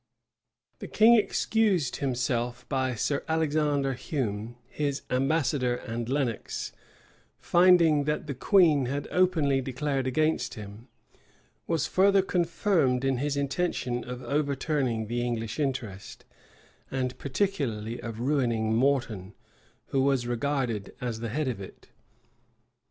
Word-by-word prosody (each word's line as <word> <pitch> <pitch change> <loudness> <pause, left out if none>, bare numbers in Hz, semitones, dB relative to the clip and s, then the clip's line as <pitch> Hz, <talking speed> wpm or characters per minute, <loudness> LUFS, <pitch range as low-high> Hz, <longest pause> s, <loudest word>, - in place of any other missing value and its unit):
The - - -7
king 220 +2 +6
excused 215 - +2
himself 125 -2 -2
by 130 -2 -1
Sir 140 +5 -1
Alexander 150 -3 +1
Hume, 120 - -3
his 140 -1 -3
ambassador; 130 -2 +1
and 120 -1 -5
Lenox, 130 -5 -2 0.7
finding 170 -5 +4
that 150 +1 -1
the 145 - -4
queen 150 - +4
had 140 +3 -3
openly 160 -7 +2
declared 135 +1 -2
against 155 +1 0
him, 105 +2 -10 0.8
was 165 -4 +1
further 195 +1 +4
confirmed 170 - +1
in 135 -1 +1
his 140 +2 -1
intention 140 -4 -1
of 125 0 -7
overturning 140 -3 -1
the 120 +2 -2
English 115 0 -3
interest, 125 -9 -4 0.6
and 130 -1 -2
particularly 130 - -2
of 115 -1 -6
ruining 120 -5 +1
Morton, 115 -6 0 0.5
who 135 - +1
was 135 -2 +2
regarded 120 -4 -2
as 120 -3 -3
the 115 0 -4
head 150 +5 -1
of 115 -6 -3
it. 95 - -12
135 Hz, 120 wpm, -28 LUFS, 120-150 Hz, 0.8 s, king